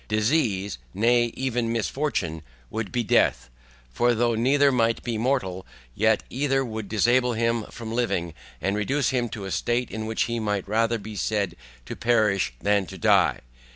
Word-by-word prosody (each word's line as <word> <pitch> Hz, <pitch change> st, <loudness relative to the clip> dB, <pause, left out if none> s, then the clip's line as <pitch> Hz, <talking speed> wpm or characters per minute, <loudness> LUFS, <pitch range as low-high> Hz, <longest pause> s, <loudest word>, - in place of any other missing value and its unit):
Disease, 105 Hz, -, 0 dB, 0.2 s
nay 120 Hz, +3 st, +3 dB
even 120 Hz, -3 st, -1 dB
misfortune 115 Hz, -, -2 dB, 0.3 s
would 110 Hz, -2 st, -3 dB
be 120 Hz, -1 st, 0 dB
death, 65 Hz, -, +2 dB, 0.4 s
for 120 Hz, -, +2 dB
though 120 Hz, +1 st, +2 dB
neither 140 Hz, +5 st, +3 dB
might 115 Hz, -2 st, +1 dB
be 120 Hz, -2 st, -2 dB
mortal, 110 Hz, -6 st, -1 dB, 0.3 s
yet 110 Hz, -, +2 dB
either 135 Hz, 0 st, +1 dB
would 110 Hz, -3 st, -6 dB
disable 120 Hz, +3 st, +3 dB
him 115 Hz, -1 st, 0 dB
from 115 Hz, -1 st, -8 dB
living, 100 Hz, -9 st, -1 dB, 0.3 s
and 100 Hz, +4 st, -1 dB
reduce 130 Hz, +6 st, 0 dB
him 120 Hz, -2 st, 0 dB
to 105 Hz, -2 st, -6 dB
a 95 Hz, -, -5 dB
state 120 Hz, +4 st, -1 dB
in 110 Hz, 0 st, -4 dB
which 110 Hz, -, 0 dB
he 115 Hz, 0 st, -2 dB
might 105 Hz, -3 st, -2 dB
rather 115 Hz, +2 st, +1 dB
be 105 Hz, 0 st, -8 dB
said 100 Hz, -4 st, -1 dB, 0.3 s
to -, -, -6 dB
perish 110 Hz, -, +2 dB
than 100 Hz, -2 st, +1 dB
to 95 Hz, -, -9 dB
die. 80 Hz, -, +3 dB
115 Hz, 165 wpm, -25 LUFS, 105-120 Hz, 0.4 s, nay